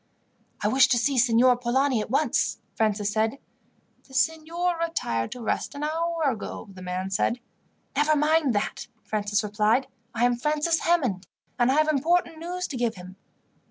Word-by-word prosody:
"I - - +3
wish 260 +4 +5
to 245 -1 +2
see 260 +2 +1
Signor 245 +1 +5
Polani 250 0 +1
at - - -6
once," 275 +1 +1 0.2
Francis 210 -2 0
said. 220 +4 0 0.7
"The 265 - -13
signor 330 +4 0
retired 115 - -2
to 245 - -9
rest 245 - -2
an 285 - -5
hour 330 +2 -1
ago," 230 -5 -3
the 185 - -11
man 185 +1 -4
said. 235 +5 0 0.6
"Never 300 +2 +3
mind 300 -4 +2
that," 205 - -2 0.2
Francis 210 0 -1
replied. 210 +5 +1 0.3
"I 235 +2 +2
am 245 -1 +2
Francis 300 +5 +1
Hammond, 255 - 0 0.3
and 240 +1 +4
I - - +2
have 310 0 +3
important 315 +3 +1
news 360 +2 -4
to 270 - -4
give 235 -2 0
him." 185 0 -11
255 Hz, 165 wpm, -26 LUFS, 215-310 Hz, 0.7 s, wish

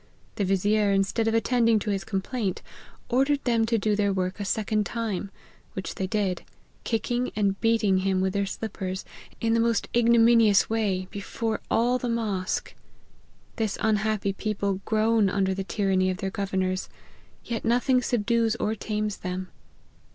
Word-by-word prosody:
The 200 - +1
vizier, 205 +2 +2
instead 195 +3 +1
of 225 - +2
attending 230 0 +3
to 210 0 -2
his 195 -2 -1
complaint, 195 +1 -3 0.4
ordered 275 +3 +2
them 230 -2 +2
to 230 0 +2
do 210 0 +1
their 200 -1 +1
work 185 0 -2
a 205 - -3
second 215 +1 0
time 220 -4 -3
j 195 - -13 0.4
which 190 - -5
they 190 - -3
did, 190 -3 -1 0.4
kicking 240 +2 -1
and 200 -2 0
beating 225 -4 +3
him 190 0 +1
with 190 0 0
their 200 0 0
slippers, 190 -3 -5 0.3
in 225 0 +1
the 230 - +3
most 230 0 +1
ignominious 230 -3 +5
way, 200 -5 -1
before 220 +2 -3
all 245 +2 +2
the 245 - -2
mosque. 210 -6 -2 0.8
This 220 -4 -1
unfiappy 215 -2 +1
people 200 -2 -2
groan 220 -1 +3
under 190 0 +1
the 195 0 -3
tyranny 190 -2 +1
of 185 - -2
their 195 -1 -3
governors; 190 -1 -2 0.6
yet 230 -1 -3
nothing 250 +2 +3
subdues 230 -1 +1
or 215 -1 -1
tames 210 -1 -3
them. 185 +1 -5
210 Hz, 160 wpm, -26 LUFS, 195-230 Hz, 0.8 s, ignominious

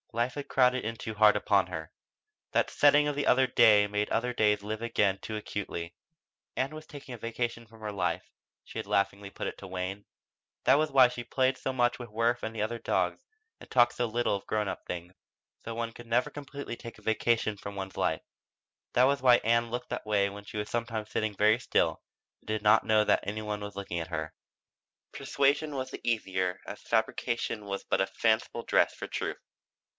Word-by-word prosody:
Life 120 +2 0
had 145 -1 -6
crowded 125 -1 +3
in 115 +1 -3
too 110 - -5
hard 105 0 +5
upon 100 -3 +2
her, 80 -3 -6 0.6
that - - +2
setting 145 0 +5
of 145 - -1
the 145 - -1
other 130 +1 +5
days 105 -4 +5
made 105 0 -1
other 125 +2 0
days 105 -3 +2
live 110 +1 -4
again 105 -4 +1
too 110 - -4
acutely. 90 -5 -5 0.6
Ann 135 +2 0
was 155 0 -9
taking 140 -3 -9
a - - -6
vacation 115 +1 -3
from 115 0 -18
her 105 -1 -5
life, 100 - -1 0.4
she - - -7
had - - -5
laughingly 100 +1 0
put - - -5
it - - -5
to 100 - -9
Wayne. 95 +2 -4 0.6
That 135 +3 +6
was 155 0 +1
why 130 -2 +7
she 120 0 -6
played 130 +2 +1
so 135 - -2
much 120 -1 +1
with 120 -2 -7
Worth 115 +3 0
and 110 - -3
the 115 +2 -2
dogs - - 0 0.4
and - - -13
talked 120 -1 +4
so 120 - 0
little 120 -1 0
of 100 - -7
grown 105 -1 0
up - - -4
things. 90 +1 -6 0.5
Though 115 - -5
one 115 0 -3
could 120 0 -12
never 120 +2 +2
completely 140 -3 -7
take 115 0 -10
a - - -17
vacation 110 -1 +1
from 100 0 -8
one's 95 -1 -6
life; - - 0 0.7
that 125 - +5
was 140 0 +2
why 125 -2 +7
Ann 115 +1 +1
looked 120 +1 -4
that - - -4
way 100 -2 +2
when 100 +1 -9
she 105 - -8
was 105 0 -3
sometimes 115 -2 -3
sitting 110 -1 -1
very 110 +2 +4
still - - +1 0.4
and - - -29
did 110 -1 -2
not 105 - +5
know 110 -1 +4
that - - +3
any 105 +2 -4
one 105 -1 -3
was 105 -1 -7
looking 95 -3 -3
at 80 - -4
her. 80 -2 -4 0.8
Persuasion 140 +2 +1
was 130 -1 -3
the - - -7
easier 95 -6 -1
as - - -8
fabrication 115 -2 -1
was 100 -1 -4
but - - +1
a 95 - +1
fanciful 115 +1 0
dress - - +3
for - - -7
truth. - - -3
110 Hz, 210 wpm, -29 LUFS, 105-120 Hz, 0.8 s, why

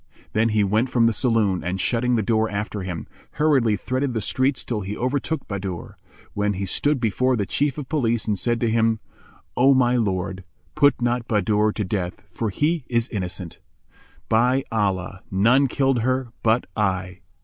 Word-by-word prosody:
Then 115 +2 +2
he 105 -1 +2
went 110 +6 +1
from 120 -2 +3
the 115 - +3
saloon 110 -5 +1
and, 90 +2 -2
shutting 125 +5 +1
the 110 - +1
door 110 +1 +1
after 105 0 -3
him, 90 -3 -5 0.3
hurriedly 135 -8 +2
threaded 130 +5 -2
the - - +1
streets 130 +3 0
till 110 -4 -3
he 100 +2 -5
overtook 140 +5 -2
Bahadur, 95 -3 -5 0.4
when 105 0 0
he 100 +1 -3
stood 145 +9 +1
before 125 +3 +1
the 105 -4 -1
Chief 140 +6 0
of 145 -4 -5
Police 120 -7 0
and 105 - 0
said 120 +4 0
to 115 -2 +1
him, 115 -1 +2 0.6
"O 135 +2 +5
my 125 -1 +3
lord, 95 -3 -1 0.3
put 145 -2 +4
not 120 -1 0
Bahadur 105 0 +2
to 105 - -2
death, 90 -3 -3
for 110 +3 -2
he 150 - 0
is 115 -1 0
innocent. 90 -4 -5 0.7
By 125 +4 +3
Allah, 95 -3 -1
none 120 +9 +4
killed 135 -1 +1
her 130 +1 0
but 115 +2 +2
I." 95 -3 -1
115 Hz, 175 wpm, -23 LUFS, 100-125 Hz, 0.7 s, O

